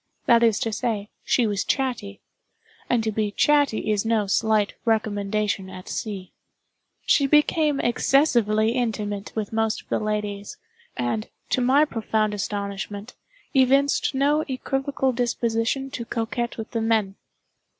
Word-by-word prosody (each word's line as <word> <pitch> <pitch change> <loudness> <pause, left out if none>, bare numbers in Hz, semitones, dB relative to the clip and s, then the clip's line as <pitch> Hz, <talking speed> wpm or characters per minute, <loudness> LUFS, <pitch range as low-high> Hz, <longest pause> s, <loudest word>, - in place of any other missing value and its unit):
That 235 -1 +5
is 225 -3 +4
to 225 - -1
say, 210 -2 -2
she 245 - +2
was 205 -2 0
chatty; 240 -7 -2 0.7
and 240 -2 +2
to 220 - 0
be 215 0 -1
chatty 285 -1 +2
is 205 -1 +1
no 225 -2 +1
slight 210 +1 +1
recommendation 210 -3 0
at 185 -1 -10
sea. 200 -5 -5 0.7
She 280 - +4
became 300 0 +3
excessively 235 -4 +2
intimate 210 -4 -2
with 220 -1 -3
most 225 0 0
of - - -38
the - - 0
ladies; 210 -1 -3 0.4
and, 120 -3 -2 0.2
to 255 - +2
my 270 +5 +4
profound 220 -5 -1
astonishment, 200 +1 -4 0.4
evinced 275 +1 +3
no 290 +3 +2
equivocal 270 0 -1
disposition 240 +2 -1
to 235 - -4
coquet 235 +1 -2
with 225 -1 -6
the 230 - -1
men. 220 -3 +1
225 Hz, 135 wpm, -24 LUFS, 205-255 Hz, 0.7 s, That